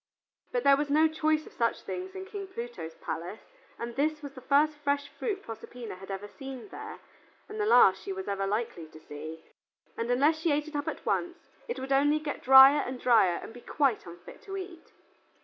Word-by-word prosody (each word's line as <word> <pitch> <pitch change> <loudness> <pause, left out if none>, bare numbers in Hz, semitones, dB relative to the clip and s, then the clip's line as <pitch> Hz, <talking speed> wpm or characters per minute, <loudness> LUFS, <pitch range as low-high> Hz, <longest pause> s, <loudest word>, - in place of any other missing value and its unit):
But - - -1
there 275 0 +6
was 290 0 -2
no 310 +2 +5
choice 310 0 0
of - - -14
such 230 -1 -1
things 375 +1 -6
in 380 0 -6
King 395 0 -7
Pluto's 235 - -7
palace, 175 +6 -6 0.4
and 235 0 -6
this 300 +2 0
was 285 -1 -7
the 255 - -11
first 295 +3 +2
fresh 285 -1 0
fruit 400 -3 -4
Proserpina 230 +1 -8
had 190 +1 -11
ever 195 +1 -5
seen 270 - -9
there, - - -8 0.5
and 430 +1 -7
the 420 - +1
last 190 - +6
she 195 - -6
was 190 0 -5
ever 195 -1 -1
likely 205 -6 -3
to 155 0 -14
see, 155 +2 -9 0.5
and 230 +1 -3
unless 290 +6 +3
she 320 0 +1
ate 295 +1 0
it 310 - -9
up 290 0 -2
at - - -5
once, 350 0 -1 0.3
it 475 - -4
would 265 +1 -6
only 290 +2 +4
get 305 -1 -5
drier 265 +2 +9
and 255 0 -5
drier 220 -9 +4
and - - -9
be 245 - -12
quite 270 -10 0
unfit 170 +1 -12
to 390 -1 -6
eat. 365 -3 -9
275 Hz, 210 wpm, -29 LUFS, 220-310 Hz, 0.5 s, drier